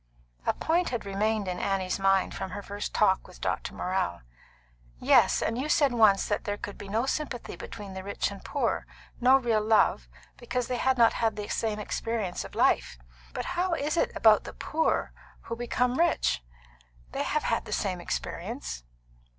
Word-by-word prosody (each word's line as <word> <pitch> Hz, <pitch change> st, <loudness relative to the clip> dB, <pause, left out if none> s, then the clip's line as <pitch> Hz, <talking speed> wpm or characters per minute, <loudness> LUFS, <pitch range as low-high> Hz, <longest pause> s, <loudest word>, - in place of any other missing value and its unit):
A -, -, +4 dB
point 340 Hz, +2 st, +1 dB
had 240 Hz, -4 st, -3 dB
remained 205 Hz, +1 st, 0 dB
in 180 Hz, -1 st, -3 dB
Annie's 195 Hz, -1 st, -1 dB
mind 195 Hz, -1 st, +2 dB
from -, -, -4 dB
her 200 Hz, +3 st, -6 dB
first 205 Hz, +1 st, -5 dB
talk 190 Hz, -3 st, +2 dB
with 180 Hz, -, -15 dB
Dr. -, -, -2 dB
Morrell. 180 Hz, -, -1 dB, 0.8 s
"Yes; -, -, +4 dB
and 230 Hz, +2 st, -1 dB
you 290 Hz, +4 st, -2 dB
said 285 Hz, -3 st, +4 dB
once 215 Hz, -4 st, +5 dB
that 205 Hz, -, -1 dB
there 205 Hz, 0 st, -2 dB
could 205 Hz, -, -7 dB
be 200 Hz, -, -9 dB
no 225 Hz, +5 st, +1 dB
sympathy 270 Hz, -4 st, -3 dB
between 205 Hz, -3 st, -8 dB
the 190 Hz, 0 st, -6 dB
rich 200 Hz, +1 st, -2 dB
and 200 Hz, -, -8 dB
the -, -, -21 dB
poor 285 Hz, -, -1 dB, 0.3 s
no 255 Hz, +2 st, +6 dB
real 235 Hz, -4 st, +1 dB
love 215 Hz, -, +3 dB, 0.3 s
because 245 Hz, 0 st, -2 dB
they 250 Hz, -, -1 dB
had 260 Hz, +1 st, +2 dB
not 230 Hz, -1 st, +5 dB
had 225 Hz, -2 st, 0 dB
the 210 Hz, -1 st, -5 dB
same 220 Hz, -2 st, -1 dB
experience 215 Hz, -2 st, -3 dB
of -, -, -11 dB
life. 60 Hz, -, +2 dB, 0.3 s
But -, -, -4 dB
how 360 Hz, 0 st, 0 dB
is 300 Hz, +1 st, -1 dB
it -, -, +1 dB
about 215 Hz, -2 st, +5 dB
the -, -, -8 dB
poor 320 Hz, +1 st, 0 dB, 0.3 s
who 230 Hz, -, -5 dB
become 245 Hz, +2 st, 0 dB
rich? 340 Hz, -, +2 dB, 0.7 s
They -, -, -2 dB
have -, -, 0 dB
had -, -, 0 dB
the -, -, -9 dB
same -, -, -1 dB
experience." -, -, -4 dB
215 Hz, 185 wpm, -28 LUFS, 195-250 Hz, 0.8 s, no